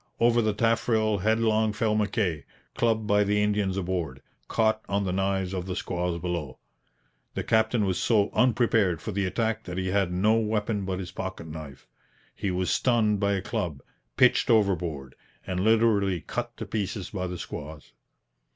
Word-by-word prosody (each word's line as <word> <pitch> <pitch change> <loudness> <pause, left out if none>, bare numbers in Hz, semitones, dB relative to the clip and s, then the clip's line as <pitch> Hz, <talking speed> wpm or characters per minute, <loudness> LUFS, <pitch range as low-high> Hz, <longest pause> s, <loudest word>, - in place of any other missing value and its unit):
Over 120 0 +4
the 110 -2 0
taffrail 110 -2 +1
headlong 110 +1 +2
fell 110 0 0
Mackay, 105 -7 0 0.3
clubbed 110 -2 +1
by 105 0 +3
the 105 +1 +1
Indians 105 -2 0
aboard, 85 -8 -3 0.2
caught 110 -1 +1
on 100 +1 +1
the 95 - -1
knives 95 -1 0
of 90 -1 -3
the 90 - -3
squaws 90 -3 -2
below. 85 -6 -4 0.8
The - - -2
captain 110 -1 +2
was 95 -2 -1
so 105 -3 +2
unprepared 115 -7 +2
for 110 - -5
the 100 0 -1
attack 115 +3 -1
that 90 0 -6
he 95 0 -1
had 95 -2 +1
no 100 +5 +3
weapon 105 -2 -1
but 95 -1 -2
his 90 -1 -6
pocket 95 -3 -6
knife. 75 -3 -9 0.5
He 100 - -3
was 90 0 0
stunned 110 -5 +2
by 100 0 +1
a 95 -1 -2
club, 75 -9 -3 0.3
pitched - - +4
overboard, 85 - +1 0.3
and 90 -1 -2
literally 105 -4 +3
cut 120 +8 -5
to - - -5
pieces 100 -2 -3
by 95 -3 -3
the 90 0 -5
squaws. 75 -1 -8
100 Hz, 170 wpm, -27 LUFS, 90-110 Hz, 0.8 s, Over